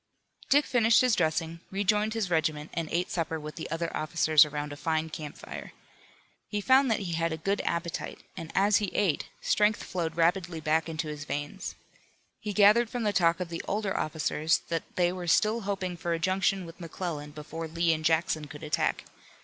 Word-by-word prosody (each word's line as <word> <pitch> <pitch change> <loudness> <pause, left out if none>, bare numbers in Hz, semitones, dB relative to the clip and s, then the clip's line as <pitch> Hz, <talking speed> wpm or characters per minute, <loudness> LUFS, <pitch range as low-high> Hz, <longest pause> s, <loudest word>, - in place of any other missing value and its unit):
Dick 290 +1 +5
finished 230 -2 +4
his 255 -2 +3
dressing, 160 +1 0
rejoined 210 +3 +1
his 205 -5 -1
regiment 155 -2 0
and 165 -2 -3
ate 175 +2 0
supper 165 -2 -2
with 150 0 -7
the 160 - -6
other 165 +1 -3
officers 155 -1 +4
around 150 0 -4
a - - -6
fine 160 +1 -1
camp 150 -2 -7
fire. - - -8 0.8
He 210 - -1
found 260 +5 +4
that 220 - +1
he 180 -3 -4
had 165 0 0
a 160 - -2
good 195 +6 -1
appetite, 170 0 -3
and 165 -1 -7
as 205 +2 +4
he 205 - 0
ate 190 -8 +1
strength 210 0 +2
flowed 165 -3 -3
rapidly 170 0 +1
back 160 +1 +1
into 160 0 -3
his 150 -1 -6
veins. 145 0 -4 0.6
He 210 - -4
gathered 215 +3 +5
from 245 -1 -3
the 210 -1 +1
talk 170 -2 +3
of 180 -2 -3
the 165 0 -4
older 205 -1 -1
officers 155 0 0
that 165 -1 -4
they 175 -1 +3
were 180 -1 -6
still 215 +6 +3
hoping 185 -3 -2
for 170 0 -2
a 165 - -1
junction 190 +1 +1
with 165 +1 -12
McClellan 165 -3 -5
before 155 +2 -7
Lee 165 +1 +2
and 155 0 -3
Jackson 160 -1 +1
could 150 +1 -10
attack. 150 - 0
170 Hz, 195 wpm, -29 LUFS, 160-195 Hz, 0.8 s, Dick